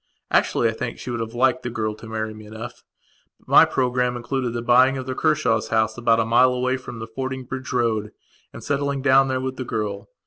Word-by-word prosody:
Actually, 115 - +2
I - - +1
think 120 +1 -5
she 125 - -6
would 120 - -3
have 115 +1 -5
liked 130 +1 +2
the 120 - -4
girl 110 -2 -2
to 110 +1 -12
marry 110 -1 -4
me 110 0 -12
enough 110 +3 -9 0.6
but - - -30
my - - +7
programme 125 -1 0
included 120 0 -2
the 120 0 -4
buying 130 +3 +4
of 130 - -5
the 130 - -3
Kershaw's - - +1
house 110 -1 +1
about 115 -1 +2
a 115 - +2
mile 125 +3 +4
away 125 +1 0
upon 125 -2 -6
the 110 - -6
Fordingbridge 130 +2 -5
road, 110 -4 0 0.4
and - - -10
settling 140 -1 -1
down 135 0 +5
there 130 -1 -1
with 130 0 -4
the 130 - -3
girl. 100 -3 -4
120 Hz, 220 wpm, -23 LUFS, 110-130 Hz, 0.6 s, my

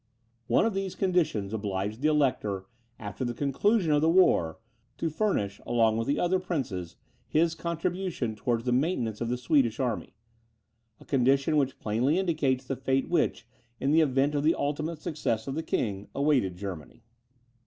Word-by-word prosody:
One - - +3
of 225 - +1
these 195 -1 -3
conditions 155 - 0
obliged 105 +1 -3
the 150 - +3
Elector, 125 -10 +1 0.3
after 105 +3 -6
the 120 -1 -2
conclusion 165 - +1
of 145 0 +3
the 160 - +3
war, 165 - +4 0.4
to 165 - -2
furnish, 145 - -1
along 115 -2 +2
with 115 - -2
the 140 - +1
other 185 +1 +2
princes, 125 - -4 0.3
his 160 +1 +2
contribution 170 - -2
towards 115 +2 -1
the 125 - -1
maintenance 125 - 0
of 115 - -1
the 125 - 0
Swedish 125 -2 +2
army, 125 -5 -2 0.8
a - - -16
condition 135 +3 +2
which 135 -2 +1
plainly 125 +8 +1
indicates 155 -8 0
the 135 - -2
fate 135 +1 0
which, 175 - 0 0.3
in 135 - +1
the 160 +2 +5
event 140 0 +2
of 145 - +1
the 160 +2 +3
ultimate 155 +3 -2
success 145 -9 -2
of 135 - -4
the 160 - -2
king, 100 -10 -2
awaited 135 -11 +1
Germany. 95 +2 -7
135 Hz, 165 wpm, -28 LUFS, 115-160 Hz, 0.8 s, the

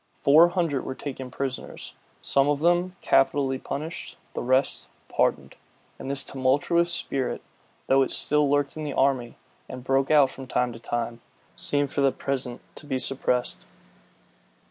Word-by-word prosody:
Four 155 +5 +6
hundred 170 -7 -1
were 130 - -5
taken 130 -2 -6
prisoners; 130 0 -5 0.3
some 135 0 +2
of 145 0 +1
them 175 +2 +2
capitally 135 -1 +2
punished, 165 +5 -6 0.2
the - - -3
rest 130 +2 0 0.2
pardoned. - - 0 0.4
And - - -6
this 140 -1 -2
tumultuous 145 +6 +1
spirit, 135 -6 -1 0.4
though 135 +1 +4
it 135 - +1
still 150 -1 +2
lurked 145 0 +1
in 155 - -5
the 145 -2 -3
army, 130 -3 +1 0.3
and 130 -1 -7
broke, 135 +1 +1
out 145 -3 +5
from 135 -1 -9
time 125 -1 0
to 115 - -10
time, 120 0 -3 0.3
seemed 145 -1 0
for 140 - 0
the 135 -1 +4
present 130 -3 -4 0.2
to 150 - -10
be 135 -2 -1
suppressed. 125 -1 -1
135 Hz, 155 wpm, -26 LUFS, 130-145 Hz, 0.4 s, Four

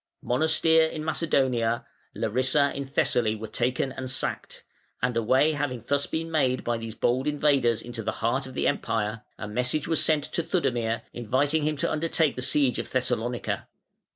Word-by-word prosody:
Monastir 160 +4 +3
in 155 -1 -5
Macedonia, 130 -8 +1 0.3
Larissa 130 +5 +2
in 140 - -3
Thessaly 120 -4 +1
were 110 +1 -6
taken 125 +4 -1
and 130 -1 -5
sacked; 130 +1 -3 0.4
and 125 -1 0
a 115 - +2
way 130 +7 +3
having 135 -5 -3
thus 140 +1 +1
been 165 +1 -3
made 130 -5 +1
by 120 - 0
these 115 -1 -7
bold 130 +3 +1
invaders 140 -6 +2
into 120 -1 -5
the 110 +1 -2
heart 130 +4 -1
of 130 - -11
the - - -1
Empire, 110 0 -1 0.2
a 105 - -6
message 125 +7 -1
was 165 -1 +3
sent 155 -2 +2
to 170 - -1
Theudemir, 120 -10 -1
inviting 135 +7 +1
him 150 0 -1
to 170 +4 0
undertake 160 -1 +1
the 125 - -4
siege 130 0 +2
of - - -5
Thessalonica. 125 -2 -1
130 Hz, 175 wpm, -26 LUFS, 120-150 Hz, 0.4 s, Monastir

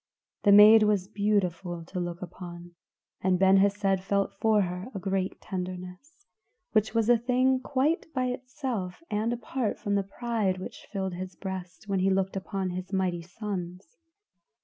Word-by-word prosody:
The 205 - +7
maid 210 +2 +9
was 210 -3 +2
beautiful 185 -5 -1
to 180 +2 -5
look 175 0 -4
upon, 175 -1 -9 0.5
and 185 -1 +2
Ben 190 +1 +5
Hesed 195 -1 +2
felt 200 +1 0
for 215 -2 +4
her 180 +2 -4
a - - -2
great 190 0 -2
tenderness, 185 - -7 0.5
which 215 0 +1
was 225 -1 +2
a 240 -1 +5
thing 255 +2 +2
quite 290 +5 0
by 255 -4 0
itself 250 - -4
and 215 +2 0
apart 240 -1 -2
from 205 - -2
the 200 - +3
pride 205 -1 -1
which 185 - -9
filled 190 -3 -2
his 185 0 -6
breast 190 +1 -7
when 195 -2 0
he 190 +1 +3
looked 195 0 0
upon 190 -1 -3
his 185 +1 -6
mighty 185 -3 0
sons. 185 - -6
195 Hz, 160 wpm, -28 LUFS, 185-220 Hz, 0.5 s, maid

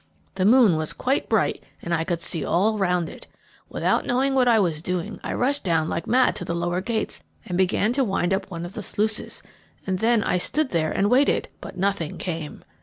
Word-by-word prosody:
The 185 -1 0
moon 220 -6 +6
was 155 0 -3
quite 265 +2 -1
bright, - - +1 0.2
and 170 - -4
I 165 -1 +1
could 170 -1 -2
see 160 -5 -2
all 210 +8 +1
round 180 -3 +1
it. - - -11 0.4
Without - - 0
knowing 265 +2 +1
what 255 -2 +3
I 235 -2 +5
was 165 -6 0
doing, 180 0 -3
I - - -3
rushed 280 +3 +1
down 165 -3 +1
like 170 - -3
mad 255 +2 +3
to - - -4
the 170 - -3
lower 175 +1 -1
gates, 220 +1 -2 0.2
and 180 - -4
began 190 +4 +2
to 270 +1 +2
wind 195 -4 0
up 195 +1 -2
one 170 -2 -5
of 175 - -9
the 215 - -5
sluices, 215 +2 -2 0.4
and 185 -1 -1
then 225 -1 +3
I 180 - +1
stood 295 - +1
there 160 -2 0
and 200 +3 +1
waited, 270 +3 +3
but - - -9
nothing 190 -3 -1
came. 165 -4 -5
190 Hz, 215 wpm, -24 LUFS, 170-230 Hz, 0.4 s, moon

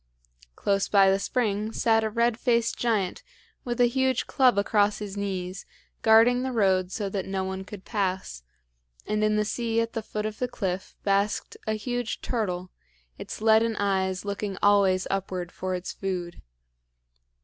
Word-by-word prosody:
Close 195 -1 0
by 195 -2 +5
the 195 - +2
spring 215 -1 -1
sat 225 -1 +2
a 220 - 0
red 235 +1 +1
faced 235 -2 +1
giant, 210 -6 0 0.4
with 240 -1 -3
a 245 - +6
huge 260 +1 +1
club 255 -5 +3
across 205 0 +2
his 205 -2 -6
knees, 190 -2 -4 0.3
guarding 225 +3 +5
the 260 0 -2
road 190 -5 +2
so 205 0 -2
that 195 -1 -3
no 190 0 -2
one 190 0 -4
could 195 0 -10
pass; 190 - -2 0.6
and 215 0 0
in 215 0 +2
the 210 0 +1
sea 230 +1 -1
at 230 0 -1
the 225 - -2
foot 210 0 -4
of 215 -1 -4
the 250 - 0
cliff 190 -6 -4
basked 200 +1 0
a 220 - +1
huge 245 +2 -3
turtle, 185 -6 -3 0.5
its - - -7
leaden 225 0 +4
eyes 190 -2 0
looking 200 -1 -3
always 195 -2 +4
upward 185 -2 -3
for 185 0 -3
its 180 +1 -5
food. 180 -3 -4
205 Hz, 165 wpm, -26 LUFS, 190-225 Hz, 0.6 s, a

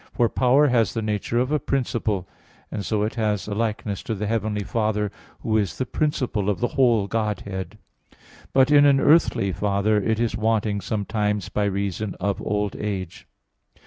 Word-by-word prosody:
For 120 -2 +2
"power" 135 +3 +4
has 115 -7 +2
the 115 - -1
nature 105 +2 -1
of 125 +3 +1
a 150 - +2
principle, 115 -8 -1 0.4
and 105 - -3
so 105 0 0
it 110 - -1
has 105 -4 -1
a 105 - -3
likeness 105 -2 -2
to 110 - -3
the 105 +1 -3
heavenly 105 -1 -1
Father, 105 -2 -1 0.3
Who 110 -2 -1
is 100 -4 -1
the 130 - -1
principle 130 -10 -1
of 100 - -1
the 120 - 0
whole 120 -6 +3
Godhead. 100 -1 -3 0.7
But 135 +1 +4
in 145 -1 +7
an 140 -1 +5
earthly 150 - +3
father 105 +2 +1
it 110 +2 0
is 120 -1 0
wanting 110 -2 0
sometimes 105 -1 -2
by 105 - 0
reason 100 0 -2
of 100 0 -1
old 105 -1 -1
age. 95 -5 -5
105 Hz, 175 wpm, -23 LUFS, 100-120 Hz, 0.7 s, in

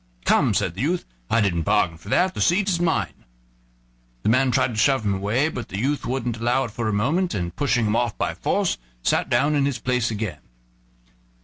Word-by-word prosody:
"Come," - - +3
said - - 0
the 95 - -5
youth, 170 +6 0 0.2
"I 115 - +3
didn't 90 -5 +1
bargain 85 +1 +1
for 85 +5 -13
that, 185 +8 +2
the - - -4
seat 190 +3 +2
is 180 -4 +1
mine." 95 - 0 1.1
The - - +2
man 130 +3 +3
tried 130 +1 +2
to 110 -2 -3
shove 135 -2 +3
him 100 - +1
away, 105 +9 0
but 125 -6 -6
the 95 - -5
youth 140 +7 -1
wouldn't 125 -2 -2
allow 120 +3 +1
it 115 - -5
for 115 +1 -3
a - - +1
moment, 150 - 0
and, 85 -2 -3
pushing 130 -5 +1
him 105 +1 +1
off 120 -2 0
by - - -1
force, - - -1 0.2
sat - - +1
down 140 +5 +2
in 145 -2 +2
his 140 -3 -1
place 125 0 0
again. 105 -8 -4
120 Hz, 215 wpm, -23 LUFS, 105-140 Hz, 1.1 s, Come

